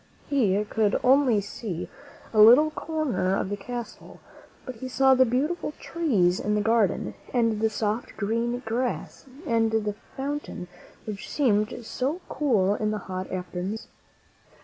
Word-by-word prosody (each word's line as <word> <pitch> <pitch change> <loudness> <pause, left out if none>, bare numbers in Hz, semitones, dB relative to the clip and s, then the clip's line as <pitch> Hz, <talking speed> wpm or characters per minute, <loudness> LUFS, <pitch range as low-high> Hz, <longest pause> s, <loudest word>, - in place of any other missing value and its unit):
He 210 -8 +2
could 215 -2 +1
only 255 -4 +4
see 195 -3 -5 0.5
a 215 - +2
little 255 +8 +8
corner 295 - -1
of - - -2
the - - 0
castle, 235 +2 -8 0.5
but 255 -3 -7
he 260 - -6
saw 265 +1 +4
the 260 0 +5
beautiful 295 +7 -1
trees 210 - +1
in 210 0 0
the 210 - +1
garden, 225 -3 +1 0.2
and 230 -3 +2
the 220 - +3
soft, 215 +1 -3
green 230 +4 -1
grass 240 +4 -3 0.2
and 225 -5 +2
the 215 -2 0 0.2
fountain 280 -9 -4 0.4
which 210 -2 -6
seemed 225 -3 +1
so 275 +9 -2
cool 215 -10 +2
in 215 0 -1
the 215 - -1
hot 185 0 -4
afternoons. 185 +3 -4
225 Hz, 145 wpm, -26 LUFS, 205-260 Hz, 0.5 s, little